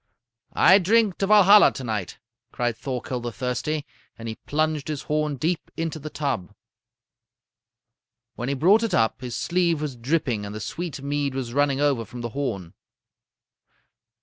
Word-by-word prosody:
"'I 190 +3 +7
drink 210 +1 +2
to 195 - +1
Valhalla 205 0 +7
to 135 - -7
night,' 110 -6 -4 0.3
cried 120 -1 -1
Thorkel 125 +1 -4
the 120 0 -5
Thirsty, 125 +6 -3 0.3
and 115 0 -8
he 110 - -3
plunged 155 +4 -2
his 150 -2 -4
horn 150 -1 -1
deep 160 +6 -2
into 165 -1 -3
the 155 +1 -7
tub. 135 - -3 1.8
"When 120 +3 -4
he 140 - 0
brought 190 +11 +4
it 225 -5 0
up, 115 +2 +1
his 125 -2 -5
sleeve 170 -2 +1
was 150 -4 -4
dripping 125 -3 -1
and 100 +1 -7
the - - -5
sweet 160 - -5
mead 140 -1 -1
was 125 -3 -4
running 140 -1 +2
over 140 -5 +2
from 120 +3 -9
the 120 - -4
horn. 110 -10 -4
140 Hz, 160 wpm, -24 LUFS, 120-160 Hz, 1.8 s, I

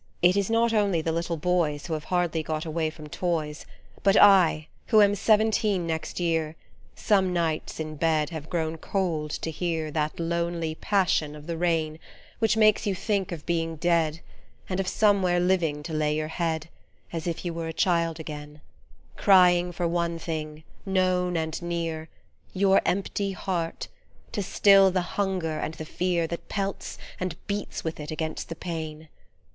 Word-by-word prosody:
It 180 +1 +6
is 200 0 +1
not 230 0 +2
only 200 -7 +2
the 165 - 0
little 170 +1 -2
boys 155 -3 0
Who 165 - -3
have 155 -1 -4
hardly 175 -3 0
got 155 0 -3
away 160 0 -1
from 155 -1 -11
toys, 155 -2 -3 0.3
But 195 0 +4
I, 185 -6 +6 0.2
who 220 - +5
am 205 -1 +6
seventeen 210 -2 +2
next 160 +1 -3
year, 165 -2 0 0.4
Some 190 -3 +2
nights, 165 -3 -1
in 155 -1 -5
bed, 155 0 +1
have 160 -1 -7
grown 160 -2 -1
cold 165 -6 -1
to 160 - -3
hear 160 -2 -2
That 155 +1 -2
lonely 170 -1 -1
passion 160 -5 +1
of 150 0 -11
the 170 0 -3
rain 160 -2 0 0.4
Which 225 -1 +2
makes 215 0 +4
you 195 - +1
think 195 0 -1
of 165 -3 -6
being 165 -1 -1
dead, 165 -1 +1 0.5
And 185 0 -2
of 190 - -1
somewhere 195 -4 +3
living 175 -5 +1
to 165 +1 -6
lay 150 -1 +1
your 155 0 -2
head 160 -2 -2 0.5
As 165 0 -3
if 170 +1 -3
you 175 - -2
were 165 0 -4
a - - -3
child 170 -1 +1
again, 150 -1 -8 0.6
Crying 180 -2 +5
for 175 0 -1
one 170 0 -1
thing, 155 -2 -5 0.2
known 185 -2 +1
and 160 0 -3
near 165 -2 -3 0.4
Your 195 0 +4
empty 195 +1 -1
heart, 175 -3 -3 0.4
to 205 - -2
still 195 0 +5
the 185 0 0
hunger 175 -3 -2
and 160 - -3
the 155 - -7
fear 175 +1 0
That 170 +1 -6
pelts 195 -1 -3 0.2
and 180 -2 -2
beats 205 0 -4
with 160 -1 -4
it 150 -1 -6
against 160 0 -4
the 165 - -4
pane. 160 -2 -6
170 Hz, 170 wpm, -26 LUFS, 160-185 Hz, 0.6 s, It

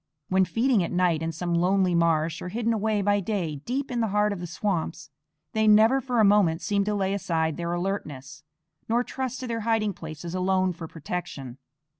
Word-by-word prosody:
When 190 0 +3
feeding 230 -1 +2
at - - -4
night 175 -3 +2
in 165 0 -2
some 175 +2 -3
lonely 180 +1 +2
marsh, 165 -1 +1
or 180 - -5
hidden 230 +3 0
away 215 -1 0
by 205 +1 +3
day 180 -7 -2
deep 260 - -3
in 240 -1 -1
the 225 - +1
heart 210 0 +1
of 195 - -6
the 175 - -5
swamps, 170 -4 -3 0.4
they 220 0 +2
never 220 +5 +6
for 245 -2 -1
a 215 - +6
moment 185 -5 +3
seem 200 +4 +1
to 210 0 0
lay 195 -1 0
aside 160 -5 -1
their 170 -1 -3
alertness, 155 -7 -4 0.5
nor 235 +2 +2
trust 260 0 -4
to 255 - -4
their 230 -1 -2
hiding 220 -2 0
places 160 0 -8
alone 185 0 +1
for 165 -1 -8
protection. 145 -6 -6
190 Hz, 200 wpm, -26 LUFS, 170-215 Hz, 0.5 s, never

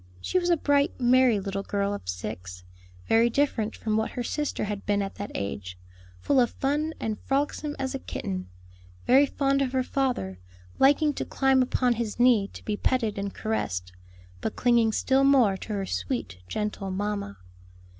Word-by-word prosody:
She 370 - 0
was 350 0 -1
a 345 - +4
bright, 285 +1 +1
merry 250 -3 +4
little 195 0 -3
girl 200 0 -1
of 205 - -6
six, 90 -1 -6 0.4
very 230 +1 +4
different 230 -4 0
from 215 -1 -1
what 220 - 0
her 245 - -3
sister 295 +4 -2
had 205 -1 -4
been 205 0 +1
at 195 - -5
that 205 - -4
age; 95 -2 -4 0.4
full 265 - +2
of 240 -2 +4
fun 300 +4 -1
and 215 -2 -3
frolicsome 290 +2 -1
as 265 -1 -3
a 270 - -3
kitten, 90 - -5 0.6
very 275 +3 +6
fond 275 0 +1
of 265 -1 -1
her 260 -1 +2
father, 250 - -1 0.4
liking 290 +2 +4
to - - -3
climb 270 -1 +2
upon 250 -1 +2
his 230 -1 -4
knee 240 -5 +5
to - - -13
be 210 - -1
petted 225 -2 0
and 200 0 -4
caressed, 90 - -2 0.5
but - - -3
clinging 235 -2 +3
still 265 +4 +2
more 260 -8 +5
to - - -9
her 195 -1 -2
sweet, 185 - -3
gentle 210 - -3
mamma. 200 - -3
230 Hz, 175 wpm, -27 LUFS, 200-270 Hz, 0.6 s, very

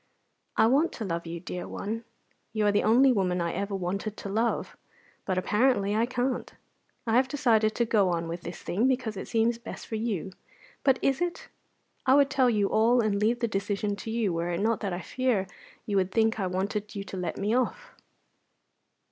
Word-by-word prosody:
I 220 - +6
want 280 +8 +3
to 225 - -5
love 170 -2 -3
you, 170 +1 -5
dear 180 +2 -6
one; 225 +3 -4 0.5
you 215 -2 +1
are 205 - +4
the 205 - +2
only 255 +5 +5
woman 185 -4 +1
I 170 -1 -1
ever 200 +2 -2
wanted 195 +3 -3
to 200 - -6
love; 225 +4 -1 0.5
but 185 -2 -1
apparently 210 +1 +2
I 225 +2 +2
can't. 250 +1 -2 0.5
I 225 -1 +1
have 255 +1 +4
decided 225 -6 +2
to 235 - +2
go 205 -4 +3
on 170 -1 -1
with 170 +1 -5
this - - -7
thing 215 +8 +1
because 255 -4 0
it 190 - -6
seems 230 0 +1
best 235 - -8
for 220 - -4
you; 210 -5 -2 0.5
but 265 -2 +4
is 275 +4 +2
it? 350 -1 -3 0.5
I 260 - +5
would 280 -1 +4
tell 260 -2 +4
you 210 -4 +2
all 235 +3 +4
and 215 -3 +1
leave 235 +3 +2
the 235 - +2
decision 205 0 -1
to 225 - -7
you, 220 -5 0
were 170 +1 -1
it 175 0 -1
not 220 +2 +1
that 200 -3 -3
I 175 +1 -3
fear 250 -6 0 0.4
you 205 -2 0
would 190 0 +1
think 225 +1 +2
I 190 - 0
wanted 200 +3 -3
you 200 - -3
to 195 - -8
let 180 -2 -3
me 210 +3 0
off." - - -1
215 Hz, 205 wpm, -28 LUFS, 195-240 Hz, 0.5 s, I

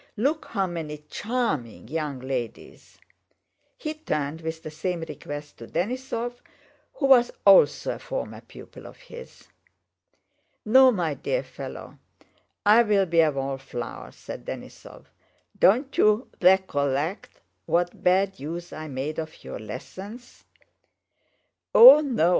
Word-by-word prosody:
"Look 285 +8 0
how 195 -4 -1
many 155 -4 -6
charming 205 - -3
young 150 -2 -4
ladies—" 130 -3 -6 0.8
He 310 -10 -4
turned 155 - -3
with 160 0 -5
the 155 - -7
same 175 +2 -3
request 145 -1 -8
to 115 - -9
Denísov 240 - -3 0.5
who 285 - -1
was 255 -3 +6 0.2
also 190 -7 +5
a - - -9
former - - -6
pupil - - -13
of - - -14
his. 480 -1 -13 1.2
"No, 260 +4 +7
my 170 -8 -1
dear - - -2
fellow, - - -9 0.7
I'll 210 -2 +5
be 170 -1 +1
a 155 -2 +3
wallflower," 135 - -5
said - - -10
Denísov. - - -10 0.5
"Don't 255 +8 +3
you 215 +4 +2
wecollect 165 -3 +1 0.3
what 175 +1 -1
bad 190 +2 +2
use 170 +4 -6
I 155 0 -7
made 140 +3 -4
of 160 0 -8
your - - -7
lessons?" 205 - -10 1.3
"Oh 470 -9 +11
no!" 245 - +1
175 Hz, 120 wpm, -25 LUFS, 150-235 Hz, 1.3 s, Oh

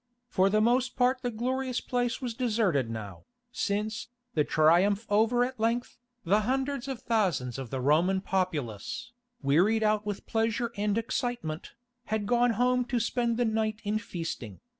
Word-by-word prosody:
For 190 -4 +3
the 215 +2 +3
most 245 +3 +2
part 255 +1 +2
the 245 - -1
glorious 255 +2 -1
place 245 0 -1
was 245 -2 -2
deserted 210 - +1
now, 105 -5 -7 0.3
since, 215 +2 -2 0.3
the 150 - +3
Triumph 175 +9 +3
over 225 +4 +4
at 255 -1 -7
length, 230 +3 -1 0.2
the 200 +5 +3
hundreds 265 +3 -1
of 265 -2 -5
thousands 165 - 0
of 130 -3 -6
the 135 - -3
Roman 165 +8 +3
populace, 180 - -2 0.3
wearied 185 +11 +3
out 215 0 +2
with 205 -2 -5
pleasure 225 +1 0
and 205 +1 0
excitement, 230 -8 -3 0.3
had 215 -1 -1
gone 240 +2 +3
home 250 +1 +3
to 245 0 0
spend 235 0 0
the 245 - +2
night 220 -1 0
in 210 0 0
feasting. 165 - -6
220 Hz, 160 wpm, -29 LUFS, 185-245 Hz, 0.3 s, over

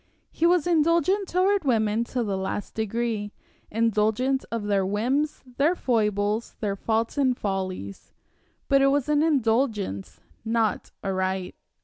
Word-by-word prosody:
He 335 - +2
was 350 -3 +3
indulgent 340 +4 +2
toward 380 +2 +2
women 225 -4 +1
to 245 0 -2
the 200 -3 -2
last 190 +2 -4
degree 220 -1 -2 0.4
indulgent 225 +4 +1
of 230 -2 -2
their 200 -2 +1
whims, 250 +10 -1
their 310 +6 +3
foibles, 210 - 0
their 200 -2 -1
faults 225 +6 -1
and 260 -3 +2
follies; 185 - -4 0.6
but 275 0 +4
it 275 - +5
was 275 0 +1
an 300 0 +3
indulgence, 225 - 0 0.2
not 225 -1 0
a 195 -1 -1
right. 185 0 -2
230 Hz, 135 wpm, -25 LUFS, 205-280 Hz, 0.6 s, it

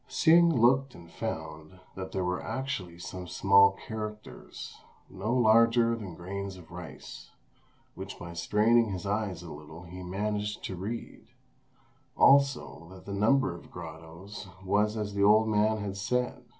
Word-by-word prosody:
'" - - -37
Hsing 170 +1 +5
looked 135 +2 +3
and 85 -1 -14
found 80 +2 -6
that 95 0 -7
there 95 - -2
were 90 0 -1
actually 115 -11 -4
some 90 +1 -7
small 100 +2 +5
characters, 105 -1 -7 0.3
no 95 +4 -3
larger 115 -1 +4
than 100 -7 -8
grains 95 +2 -6
of 85 -3 -15
rice, 85 -5 -10 0.6
which - - -8
by 85 0 -8
straining 110 +6 +3
his 90 0 -5
eyes 100 -4 -2
a 85 - -9
little 75 +3 -11
he 90 +2 -9
managed 105 +3 -3
to 95 - -4
read; 105 +6 -6 0.9
also, 140 - +3
that 95 0 -13
the 100 - -6
number 110 +1 +2
of 85 - -12
grottoes 80 +6 -9 0.2
was 105 +3 +1
as 105 -1 -3
the 100 - -1
old 110 +2 +5
man 110 0 +2
had 100 -2 -4
said. 125 +4 -2
100 Hz, 150 wpm, -29 LUFS, 90-110 Hz, 0.9 s, Hsing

